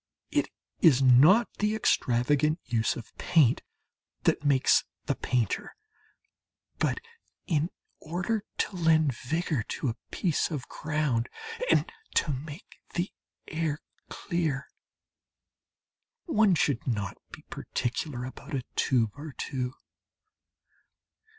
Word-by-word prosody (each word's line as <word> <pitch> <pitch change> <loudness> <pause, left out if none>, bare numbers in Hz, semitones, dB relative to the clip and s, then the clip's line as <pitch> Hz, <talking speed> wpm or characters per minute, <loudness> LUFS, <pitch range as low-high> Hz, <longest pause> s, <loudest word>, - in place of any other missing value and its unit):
It - - +1 0.3
is 140 -6 +6
not 150 - +7
the 210 +1 +2
extravagant 145 - +2
use 115 -1 +1
of 115 - -10
paint 145 -8 +4 0.6
that - - +2
makes 140 -3 +4 0.2
the - - +1
painter. 120 -5 -1 1.0
But, - - +1 0.5
in 160 0 +1 0.3
order 180 +7 -2
to 195 - -1
lend 160 -4 +4
vigour 155 +2 -1
to 125 +4 -3
a 115 - -2
piece 170 -6 0
of 145 -6 -4
ground 150 -6 -1 0.4
and - - +4 0.3
to 155 - +3
make 145 +6 -8 0.2
the 175 +2 -1 0.4
air 155 -2 -1 0.3
clear, 160 -7 -2 1.5
one 215 - +4
should 140 -5 +1
not 100 -6 -2
be - - -11
particular 125 +1 -3
about 140 +3 -7
a 130 - -2
tube 115 -5 +2
or 150 0 -8
two. 130 -2 -3
145 Hz, 110 wpm, -29 LUFS, 125-165 Hz, 1.5 s, not